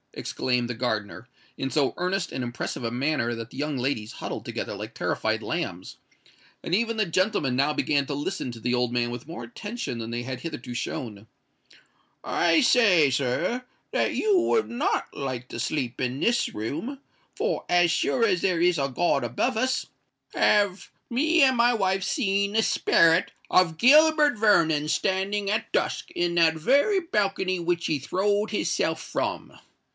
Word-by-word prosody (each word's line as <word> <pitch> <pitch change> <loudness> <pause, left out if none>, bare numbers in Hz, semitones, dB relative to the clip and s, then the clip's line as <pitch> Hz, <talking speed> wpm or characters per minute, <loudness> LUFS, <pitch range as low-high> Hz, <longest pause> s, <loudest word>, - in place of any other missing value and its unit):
exclaimed 125 -2 -1
the - - -2
gardener, 110 0 -3 0.3
in 135 - -2
so 140 -1 +1
earnest 180 0 -2
and 130 - -3
impressive 120 +1 -5
a 115 - -2
manner 125 -1 0
that 115 0 -6
the - - -13
young 145 0 -2
ladies 120 -4 -2
huddled - - -6
together - - -5
like - - -7
terrified 110 0 -1
lambs, 100 - -4 0.7
and 175 - 0
even 230 +2 0
the 215 - +2
gentlemen 185 - 0
now 140 +3 +2
began 145 -1 0
to 145 - -4
listen 140 -3 -3
to 115 - -10
the 120 +2 -1
old 125 -1 +1
man 120 -1 0
with 120 +3 -7
more 170 - -7
attention 215 - -6
than 115 0 -5
they 120 +1 -3
had 130 0 -6
hitherto 125 -6 -6
shown: 110 -3 -5 1.0
"I 315 - +2
say, 205 - +5
sir, 140 - -1 0.3
that - - 0
you 415 -3 +2
would 440 +5 +1
not 240 +5 -1
like 130 -3 -5
to - - -6
sleep 130 -1 -2
in 130 +1 -2
this 240 +7 +1
room—for, 170 - -5
as 175 -1 +4
sure 230 +7 +1
as 185 -5 +1
there 185 -3 +1
is 175 -1 +3
a 135 0 0
God 140 0 +1
above 120 - -1
us, 255 +3 0 0.5
have 205 -2 +2 0.2
me 315 +7 +2
and 260 -1 +4
my 240 +1 +4
wife 195 -3 0
seen 200 - 0
the 225 +1 +3
sperret 165 -2 +3 0.2
of 170 -3 +3
Gilbert 300 - +5
Vernon 160 -8 +3
standing 195 +3 0
at 215 +2 -1
dusk - - -1
in 175 0 -1
that 165 -2 +4
very 280 - +3
balcony 195 - -1
which 170 0 -1
he 155 - +1
throwed 205 +9 0
his 210 - -1
self - - 0
from." - - -4
170 Hz, 170 wpm, -25 LUFS, 125-210 Hz, 1.0 s, say